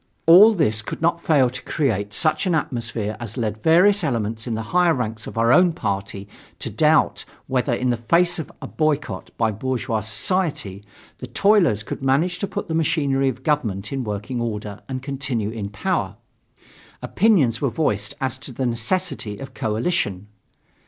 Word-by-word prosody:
All 200 +7 +8
this 110 - +2
could 105 - -6
not 170 +1 +1
fail 145 -7 +3
to 125 - -6
create 105 -9 -1
such 155 - +1
an 175 - +2
atmosphere 115 -8 -3
as 115 0 -7
led 110 -2 -2
various 185 +5 +4
elements 115 -4 -2
in 115 - -2
the 110 - -3
higher 175 -2 +4
ranks 110 -3 -4
of - - -8
our 115 +2 +4
own 180 -1 +5
party 100 - -4 0.3
to - - -3
doubt - - +2 0.2
whether, 130 0 0
in 125 +1 0
the 120 - -1
face 170 +9 +2
of 160 - -6
a - - -5
boycott 155 -2 -2
by 115 -1 +1
bourgeois 120 +1 -2
society, 110 - -1 0.4
the - - -7
toilers 195 - +3
could 120 - -6
manage 155 +7 +1
to 200 - -2
put - - -5
the 165 - -3
machinery 140 -4 +1
of 130 0 -7
government 110 -9 -1
in 135 -1 -2
working 105 +3 -4
order 105 -3 -4
and 130 -1 -4
continue 130 -6 -2
in 105 -3 -5
power. 105 - -2 0.9
Opinions 165 - +2
were 140 - +1
voiced 105 -5 -1
as 130 -1 -2
to 130 - -8
the 130 +2 -3
necessity 120 - -2
of 135 - -9
coalition. 110 - -1
130 Hz, 170 wpm, -22 LUFS, 110-160 Hz, 0.9 s, All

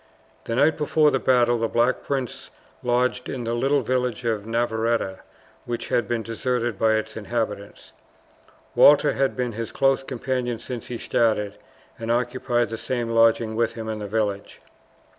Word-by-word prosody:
The 115 - -2
night 150 +5 +3
before 150 0 +3
the 135 - +1
battle 120 -2 +3
the 115 - +1
Black 120 +3 +1
Prince 135 -4 -4 0.3
lodged 125 +1 0
in 125 -2 -4
the 115 0 -2
little 135 +4 +2
village 125 -1 -1
of 110 -2 -1
Navarretta, 115 -3 0 0.5
which 120 -1 -4
had 120 -4 +1
been 120 -2 -1
deserted 120 -1 -2
by 110 -1 +3
its 110 0 -2
inhabitants. 105 -2 -4 0.8
Walter 145 0 +6
had 135 0 0
been 125 -1 -1
his 115 0 -5
close 135 0 +2
companion 125 -2 -2
since 120 +1 -7
he 120 - -4
started, 110 -3 0 0.4
and 115 0 -5
occupied 120 0 0
the 115 - -4
same 120 0 -2
lodging 115 -1 +3
with 115 +1 +1
him 110 -1 -6
in 110 -1 -3
the 105 - -5
village. 100 -1 -2
120 Hz, 160 wpm, -24 LUFS, 110-125 Hz, 0.8 s, Walter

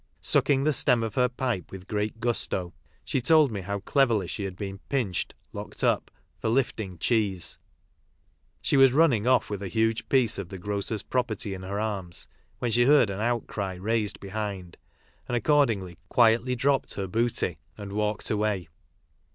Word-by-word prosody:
Sucking 135 -1 +3
the 155 +1 +2
stem 125 -3 +3
of 110 -1 -3
her 125 0 +2
pipe 125 -7 -2
with 95 0 -9
great 105 +1 -2
gusto, 110 -6 -1 0.3
she 135 - -1
told 155 0 +5
me 100 -3 -4
how 100 +2 -4
cleverly 120 -8 +2
she 100 +4 -4
had 95 -2 -5
been 95 0 -6
" - - -36
pinched" 120 -10 -1 0.2
(locked - - -7
up) - - +2 0.3
for - - -1
lifting 110 -7 -1
cheese. 100 -2 0 1.0
She - - +2
was 135 -2 +7
running 135 -8 +3
off 130 -2 +4
with 100 -1 -3
a 100 - -3
huge 110 +2 0
piece 125 -6 +3
of 95 -3 -6
the 95 - -7
grocer's 100 +2 -3
pro 125 - +1
perty 110 -4 -5
m 95 - -7
her 100 +2 -4
arms 100 -5 -3 0.3
when 120 - -2
she 120 +2 +4
heard 135 -6 +5
an 95 - -5
outcry 110 -4 -2
raised 105 +2 -1
behind, 100 -3 -5 0.5
and 120 - -1
accordingly 115 - +1
quietly 120 +2 +4
dropped 135 +2 +1
her 100 - -2
booty 110 -6 0 0.2
and 100 -2 -7
walked 105 0 -1
away. 105 -5 -1
110 Hz, 175 wpm, -27 LUFS, 100-120 Hz, 1.0 s, was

